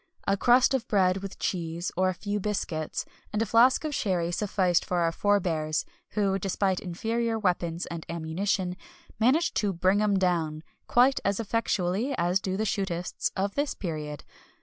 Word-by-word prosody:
A 195 - +3
crust 245 +5 +4
of 265 -4 -1
bread 185 -3 +3
with 195 0 -7
cheese, 170 -1 -2
or 185 +1 +2
a 185 - -2
few 205 +2 -3
biscuits, 185 -6 -2 0.3
and 210 - -1
a 225 - +2
flask 235 +6 +4
of 305 -1 -2
sherry 180 -8 0
sufficed 185 -2 +1
for 180 - -2
our 165 -1 +2
forebears, 165 -5 0 0.3
who, 195 -2 +1
despite 190 0 0
inferior 225 +6 -2
weapons 175 -4 -1
and 170 -1 -6
ammunition, 180 +3 -1 0.4
managed 275 +10 +3
to 205 -2 +1
"bring 185 +4 +2
'em 205 -2 +2
down" 165 -4 0 0.2
quite 255 +3 +4
as 200 +1 0
effectually 225 +2 0
as 175 +2 +2
do 190 0 -2
the 215 - 0
shootists 190 -4 -2
of 200 +1 -1
this 285 0 -1
period. 150 -5 -5
190 Hz, 165 wpm, -27 LUFS, 175-210 Hz, 0.4 s, crust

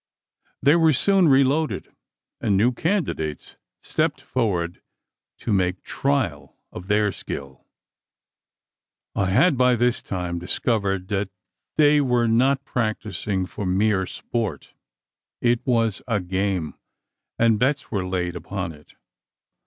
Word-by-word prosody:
They 145 +4 +6
were 160 -2 +4
soon 190 +5 +3
reloaded; 140 +3 +2 0.5
and 100 - +1
new 115 +5 +4
candidates 125 - -2 0.3
stepped - - 0
forward 90 -9 -2 0.6
to 110 - -2
make 90 -1 0
trial 130 - -1 0.2
of 90 - -9
their 105 0 +2
skill. 70 -6 -8 1.5
I 100 - 0
had 135 - +3
by 125 -1 +5
this 120 +1 +1
time 90 -2 -3
discovered 95 0 -1
that 100 -1 -1 0.5
they 150 -1 +5
were 125 -3 +2
not 135 +4 +2
practising 110 -4 -2
for 95 +1 -5
mere 95 0 +2
sport. 110 - -4 0.7
It 120 -1 +2
was 115 -4 +2
a 115 -4 +1
game, 95 -3 -1 0.6
and 115 -2 +3
bets 135 +3 0
were 100 -4 -1
laid, 90 -1 -2
upon 85 +1 -4
it. 75 -1 -17
105 Hz, 120 wpm, -23 LUFS, 95-125 Hz, 1.5 s, They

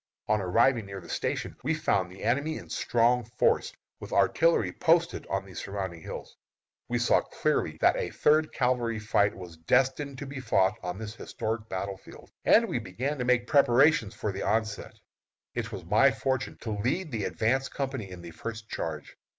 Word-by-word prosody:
On 105 -1 +2
arriving 115 +4 +2
near 100 0 -6
the - - -13
Station - - -2
we 160 +5 0
found 95 -11 0
the 95 - -11
enemy 145 +8 0
in - - -10
strong 120 +1 +2
force, 115 +3 +1 0.3
with - - -9
artillery 165 +1 +3
posted 170 +1 +2
on 95 0 -2
the 95 - -13
surrounding 95 -2 -5
hills. - - -8 0.5
We - - +1
saw - - +3
clearly - - -1
that - - +5
a - - -2
third 155 +1 +3
cavalry 125 -4 0
fight 105 -1 +1
was 90 -3 -10
destined 135 - +1
to 145 - -6
be 135 0 -6
fought 100 -7 +2
on 90 +1 -4
this 110 0 -6
historic 110 -1 -4 0.4
field, - - -14
and 230 +1 +5
we 120 - -1
began 125 +8 -3
to 125 - -1
make 125 -1 +3
preparations 135 -4 +4
for 105 - -2
the 95 - -5
onset. 110 0 -1 0.6
It 115 -1 -3
was 95 -5 -7
my 105 +10 +5
fortune 130 +2 -2
to 110 - -4
lead 130 - -1
the 110 -5 -2
advance 135 +5 0
company 130 -7 -4
in 90 -2 -10
the 85 - -8
first 110 +5 -7
charge. 75 -3 -5
115 Hz, 180 wpm, -28 LUFS, 100-135 Hz, 0.6 s, that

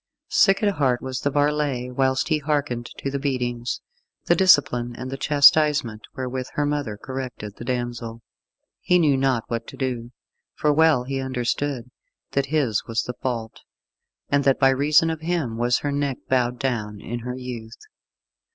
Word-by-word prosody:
Sick 195 +1 +4
at 205 -2 +1
heart 130 -4 +1
was 130 -2 -3
the 145 - 0
varlet 145 -3 0
whilst 130 +1 +1
he 155 -2 +2
hearkened 140 -5 -1
to 140 - -3
the 140 - -2
beatings, 125 -3 -2 0.4
the - - +4
discipline 125 -10 +4
and 130 +2 -6
the - - -3
chastisement 145 -4 +4
wherewith 130 -1 -4
her 145 - 0
mother 145 -8 -2
corrected 125 -5 -6
the - - -8
damsel. 120 -2 -4 0.6
He 180 - +3
knew 155 -5 +4
not 130 -3 +1
what 115 -1 -4
to - - -10
do, 120 -3 -3 0.4
for 150 -1 +2
well 160 -4 +4
he 135 +1 -3
understood 130 0 -2 0.4
that 140 0 0
his 135 -7 +1
was 115 0 0
the 125 - -5
fault, 115 -3 -3 0.7
and 140 0 +2
that 135 -1 +3
by 135 - +5
reason 150 +4 +3
of 160 -1 -5
him 160 -8 -1
was 120 0 +2
her 145 - -2
neck 140 -2 -1
bowed 125 -1 +1
down 110 -5 -2
in 120 +3 -5
her 125 +1 -5
youth. 120 -3 -7
130 Hz, 170 wpm, -23 LUFS, 120-145 Hz, 0.7 s, by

